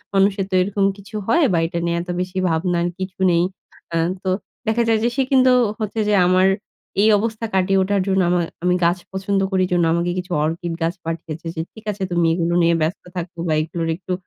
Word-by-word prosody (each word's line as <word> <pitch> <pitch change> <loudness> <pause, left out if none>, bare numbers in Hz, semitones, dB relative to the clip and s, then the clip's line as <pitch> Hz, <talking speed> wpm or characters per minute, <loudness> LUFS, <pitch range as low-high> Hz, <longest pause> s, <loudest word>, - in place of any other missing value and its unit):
মানুষের 195 0 +3
তো - - -9
এরকম 200 +1 +1
কিছু 200 +2 -12
হয়, 335 +8 +4
বা 170 - +3
এটা 170 0 -3
নিয়ে 170 0 0
এত 175 - -10
বেশি 185 +1 -5
ভাবনার 170 +1 0
কিছু 185 0 -6
নেই। 170 0 +3 0.5
অ্যা 165 - 0 0.2
তো 190 - -1 0.4
দেখা 225 +2 +2
যায় 225 -1 +3
যে, 235 - +3
সে 270 - +2
কিন্তু 260 -1 +5 0.3
হচ্ছে 215 0 -3
যে, - - +3
আমার 185 +1 +4 0.5
এই 215 - +5
অবস্থা 225 +1 -2
কাটিয়ে 190 +1 +2
ওঠার 200 +1 +1
জন্য 190 0 +2
আমার 175 -1 +2 0.2
আমি 180 0 +3
গাছ 175 +2 +3
পছন্দ 195 +1 -1
করি 185 -1 +2
জন্য 175 -1 +3
আমাকে 170 +1 0
কিছু 180 0 -5
অর্কিড 165 +2 -3
গাছ 165 +1 +1
পাঠিয়েছে। 165 0 -5
যে, 160 - -2
ঠিক 220 -1 -14
আছে 200 -1 -5
তুমি 170 -1 +2
এগুলো 170 0 0
নিয়ে 170 0 +4
ব্যস্ত 160 +4 -1
থাকো। 175 0 -5
বা 160 - +1
এগুলোর 165 +1 -3
একটু 185 +1 -5
185 Hz, 210 wpm, -21 LUFS, 170-200 Hz, 0.5 s, কিন্তু